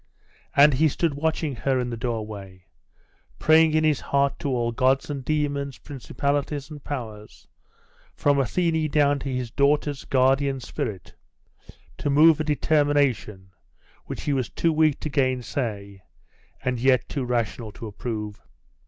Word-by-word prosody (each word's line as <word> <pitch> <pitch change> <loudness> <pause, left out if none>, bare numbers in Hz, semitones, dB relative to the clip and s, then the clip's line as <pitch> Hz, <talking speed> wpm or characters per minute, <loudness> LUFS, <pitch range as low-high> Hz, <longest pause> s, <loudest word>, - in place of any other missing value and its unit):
And 145 +1 +7
he 155 +5 +3
stood 160 +1 0
watching 155 -1 -1
her 130 +2 0
in 125 -1 -2
the - - -3
doorway, 105 -6 -5 0.7
praying 160 0 +4
in 155 - +3
his 155 -3 +2
heart 140 0 0
to 150 -4 -3
all 120 -2 0
gods 130 +4 +1
and 140 -2 -5
demons, 140 -2 -1
principalities 140 +1 -3
and 145 -2 -9
powers, 110 -7 -7 0.7
from 145 -1 +2
Athene 160 +4 0
down 145 -1 +2
to 135 - -5
his 125 -2 -3
daughter's 145 +1 +1
guardian 135 +1 +2
spirit, 110 -5 -5 0.9
to - - -1
move 155 +2 +6
a - - +1
determination 145 -10 +1 0.5
which - - -6
he 145 - 0
was 130 -3 -1
too 165 -1 0
weak 155 -2 +2
to 155 - -3
gainsay, 125 -7 -2 0.6
and 125 -2 -1
yet 130 -1 +3
too 140 - -3
rational 115 -2 -2
to 115 - -9
approve. 105 -1 -5
135 Hz, 145 wpm, -24 LUFS, 120-145 Hz, 0.9 s, And